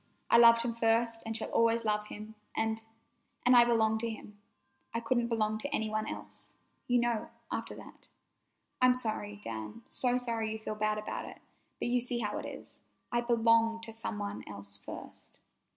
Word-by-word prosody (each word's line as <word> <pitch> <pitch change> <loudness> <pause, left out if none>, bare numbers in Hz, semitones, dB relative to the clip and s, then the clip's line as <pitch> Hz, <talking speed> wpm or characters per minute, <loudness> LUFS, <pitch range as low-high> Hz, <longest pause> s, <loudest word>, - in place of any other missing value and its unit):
I - - +8
loved 230 0 +8
him 235 -1 -1
first 230 0 +2
and 225 0 0
shall 225 - -4
always 230 0 +3
love 210 0 +1
him, 215 +1 -8 0.2
and—and—I 225 +2 +1
belong 220 -2 +3
to 230 +1 -2
him. 210 -2 -9 0.6
I - - +2
couldn't 235 +1 +1
belong 215 -2 0
to 250 - -3
any 220 -6 0
one 215 0 -1
else, - - -6 0.3
you 245 0 +4
know, 235 -2 0 0.2
after - - -3
that. - - -13 0.7
I'm 255 0 +6
sorry, 215 -4 -3
Dan, 110 - -6
so 250 -1 +1
sorry 230 -3 -1
you - - -4
feel 220 0 -4
bad 215 0 0
about 215 - -4
it, - - -10 0.4
but - - -2
you 245 0 +2
see 245 0 -1
how 215 -3 -2
it - - -5
is. - - -10 0.3
I 240 - +2
belonged 230 -1 +3
to 225 -1 -7
some 225 -1 -3
one 205 0 -4
else 100 -1 -5
first." - - -9
225 Hz, 180 wpm, -32 LUFS, 215-235 Hz, 0.7 s, I